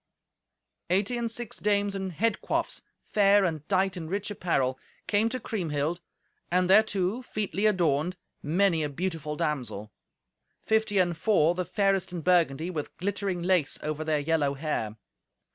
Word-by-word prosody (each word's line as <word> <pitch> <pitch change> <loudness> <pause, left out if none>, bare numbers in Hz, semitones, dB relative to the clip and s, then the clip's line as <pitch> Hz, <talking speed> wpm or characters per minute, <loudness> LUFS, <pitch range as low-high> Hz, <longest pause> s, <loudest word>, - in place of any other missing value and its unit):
Eighty 195 +6 +1
and 235 -1 -1
six 235 -1 -5
dames 205 -1 +1
in 195 -1 -3
head 220 +6 0
coifs, - - -2 0.2
fair, 200 -1 +4
and 155 -4 -3
dight 190 -1 +1
in 165 -3 -6
rich 200 +2 -2
apparel, 135 -9 0 0.3
came 215 +2 +2
to 255 +2 -3
Kriemhild, 170 - -2 0.5
and 180 +1 +2
thereto, 200 +2 +3
featly 215 -3 -1
adorned, 175 -3 +1 0.2
many 170 +2 +2
a 150 - -1
beautiful 160 -1 -3
damsel; 125 -9 -3 0.7
fifty 220 -2 +2
and 175 -2 +3
four, 170 -3 +3
the 180 0 -2
fairest 195 0 +1
in 175 -2 -4
Burgundy, 170 -1 +2
with 150 -4 -5
glittering 195 -2 -2
lace 180 -5 +2
over 155 0 -2
their 155 -1 +1
yellow 145 -1 +1
hair. 135 -7 -3
180 Hz, 145 wpm, -28 LUFS, 155-200 Hz, 0.7 s, fair